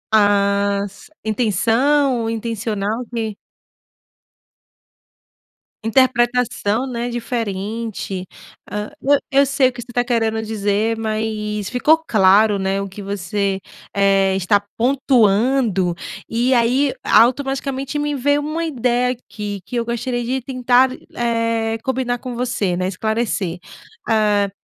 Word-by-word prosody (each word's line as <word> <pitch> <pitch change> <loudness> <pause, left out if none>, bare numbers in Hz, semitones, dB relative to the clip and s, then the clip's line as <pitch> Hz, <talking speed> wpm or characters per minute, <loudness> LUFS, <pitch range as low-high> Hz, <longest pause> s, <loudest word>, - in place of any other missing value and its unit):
A 200 -1 +3
s 200 +1 -15 0.2
intenção 235 +4 +2
intencional 225 0 -2
que 220 -3 -3 2.5
Interpretação, 245 -1 +2
né, 240 -1 -3
diferente, 220 -4 -4 0.5
hã. 210 +1 -3
E 285 +1 +4 0.2
eu 280 - +7
sei 275 -1 +3
o - - -1
que 240 - -7
você 240 - -11
tá 245 - +2
querendo 225 -2 0
dizer, 215 +1 0
mais 215 -2 -2
ficou 295 +6 +4
claro, 205 +1 +5
né, 195 0 -1
o 200 - -4
que 195 +2 -9
você, 195 0 -2 0.3
eh, 195 -1 +3
está 200 +2 +2 0.2
pontuando 235 -6 +2 0.4
e 240 +3 +1
aí 255 +3 +2
automaticamente 270 +3 +2
me 295 0 -1
veio 285 +2 +2
uma 310 +3 -3
ideia 250 -4 +1
aqui 210 -4 -6
que - - -7
eu 235 - +1
gostaria 240 +1 -2
de 255 +3 -1
tentar, 255 0 +3 0.3
eh, 230 -1 0
combinar 255 -2 -1
com 255 0 -6
você, 235 -7 -1
né, 185 0 -1
esclarecer, 210 -3 -1 0.5
hã 210 -3 +2
230 Hz, 115 wpm, -20 LUFS, 205-250 Hz, 2.5 s, eu